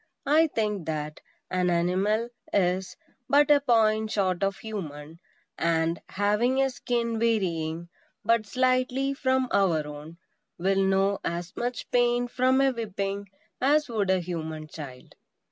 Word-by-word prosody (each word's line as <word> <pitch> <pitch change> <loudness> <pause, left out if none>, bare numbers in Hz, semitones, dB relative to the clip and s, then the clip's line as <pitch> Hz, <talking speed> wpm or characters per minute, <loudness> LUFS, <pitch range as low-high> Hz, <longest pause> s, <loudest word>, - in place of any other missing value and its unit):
I 310 +3 +4
think 210 - -2
that 150 -1 -4 0.3
an 180 -1 +1
animal 190 +7 +1 0.2
is 185 -1 0 0.3
but 290 +2 +5
a 290 - +7
point 220 -5 +2
short 190 -4 0
of 195 0 0
human; 160 -7 -7 0.4
and, 165 0 +1
having 210 +6 +1
a 270 0 +2
skin 235 -3 -2
varying 170 -7 0 0.4
but 230 -2 +2
slightly 255 +2 +1
from 260 -1 +1
our 170 -6 +2
own, 150 +3 -9 0.4
will 195 +2 +2
know 195 +1 +2
as 170 +1 -4
much 245 +1 -4
pain 245 0 +2
from 255 +2 +2
a 270 -1 +4
whipping 200 -4 -4 0.3
as 290 +2 +3
would 210 -4 -1
a 190 0 +3
human 160 -3 -5
child. 140 -5 -10
200 Hz, 135 wpm, -27 LUFS, 170-245 Hz, 0.4 s, a